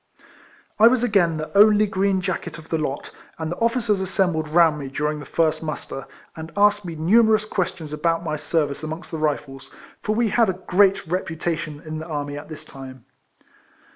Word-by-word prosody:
I 220 - +9
was 245 0 +3
again 185 -8 +2
the 155 +4 -6
only 210 +1 +6
green 195 -1 0
jacket 185 -2 -4
of 160 -1 -13
the 160 - 0
lot, 145 -2 -4 0.3
and 160 0 -4
the 175 - -4
officers 230 -3 +1
assembled 180 -4 0
round 160 -1 +4
me 140 - -5
during 150 +2 -2
the 145 - -10
first 160 -1 +1
muster, 150 -4 -6 0.3
and 160 0 -8
asked 205 0 +4
me 170 -3 -6
numerous 215 +6 +4
questions 170 -6 -3
about 165 +2 0
my 155 -2 -2
service 150 -2 -1
amongst 160 +2 -6
the 160 - -4
Rifles, 140 -3 -3 0.3
for 215 - -1
we 230 0 +2
had 215 +1 +3
a - - +1
great 195 +2 +2
reputation 165 -3 -3
in 155 0 -5
the 160 - -7
army 145 -2 -4
at 145 - -9
this 155 - -9
time. 130 -2 -11
165 Hz, 185 wpm, -23 LUFS, 155-195 Hz, 0.3 s, I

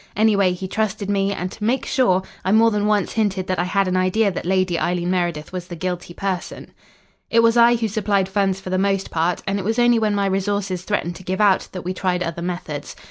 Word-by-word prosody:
Anyway, 205 -4 +3
he 180 +1 -5
trusted 205 0 -2
me, 195 0 +1
and 185 -2 -4
to 215 - -9
make 245 +5 0
sure, 190 -9 +2 0.2
I 185 - 0
more 225 +2 +5
than 210 -1 0
once 210 -3 +1
hinted 200 -4 0
that 185 -2 -2
I 175 - +1
had 195 +1 +1
an 185 - 0
idea 185 +3 +2
that 175 - -5
Lady 185 -2 +1
Eileen 175 0 -1
Meredith 175 -3 -2
was 180 -1 -5
the 175 - -7
guilty 180 0 -4
person. 190 -3 -4 0.6
"It 230 0 +4
was 230 0 +4
I 235 0 +6
who 230 -1 -1
supplied 200 -2 0
funds 195 -1 0
for 185 - -7
the 185 - +1
most 195 0 0
part, 170 +2 0
and 195 +1 -1
it - - -4
was 225 +4 -1
only 240 -1 +4
when 215 -2 +1
my 200 -1 +1
resources 195 -1 -1
threatened 175 -5 -2
to 185 - -13
give 185 +1 -3
out, 205 -3 +3
that 185 - -7
we 180 +1 -3
tried 180 -1 -1
other 165 0 -4
methods. 175 -4 -5
190 Hz, 240 wpm, -21 LUFS, 180-210 Hz, 0.6 s, I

